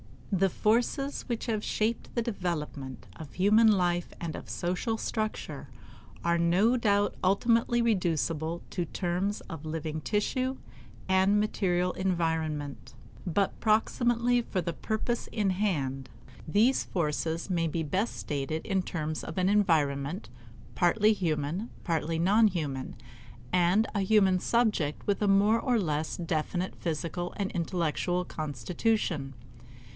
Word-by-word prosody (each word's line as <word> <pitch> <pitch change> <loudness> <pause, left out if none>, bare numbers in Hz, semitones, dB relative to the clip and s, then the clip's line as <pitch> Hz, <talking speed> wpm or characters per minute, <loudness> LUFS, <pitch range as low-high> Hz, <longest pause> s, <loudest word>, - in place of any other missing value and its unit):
The 195 0 +3
forces 245 - 0
which 235 -3 -2
have 215 -2 -1
shaped 220 +2 -1
the 235 - +2
development 155 - -4
of 155 -4 -9
human 210 +4 +5
life 175 -4 +1
and 165 -2 -4
of - - -8
social 185 +6 -1
structure 215 -1 -3 0.6
are 170 0 +2
no 185 +8 +3
doubt 205 -4 +2
ultimately 230 +5 +3
reducible 170 -5 0
to 175 - -1
terms 180 +4 -2
of 160 -2 -9
living 155 0 -3
tissue 255 - -1 0.5
and 190 +2 +4
material 180 -4 +1
environment; 160 -6 -2 0.3
but 195 +3 0
proximately 240 +2 +2
for 205 -5 -3
the 170 -1 -3
purpose 220 +7 -2
in 205 -4 +1
hand, 140 -10 -1 0.4
these 220 +11 +3
forces 165 0 -2
may 170 -2 +1
best 160 -1 -3
be 195 +4 +2
stated 145 +2 -3
in 195 -3 +1
terms 155 -3 -3
of 160 - -7
an 185 +1 +2
environment, 160 -4 +1 0.4
partly 210 +4 +4
human, 165 +2 -2
partly 165 -1 -1
non 205 +7 +5
human, 150 -9 -3 0.6
and 180 +5 +4
a 205 - 0
human 195 -2 +4
subject 210 -10 +1
with 205 0 0
a 205 - +2
more 205 +3 +4
or 250 -2 +1
less 155 -6 -1
definite 175 +2 -2
physical 170 +2 -3
and 200 -2 -2
intellectual 175 +1 -1
constitution. 155 - -2
180 Hz, 130 wpm, -29 LUFS, 160-215 Hz, 0.6 s, human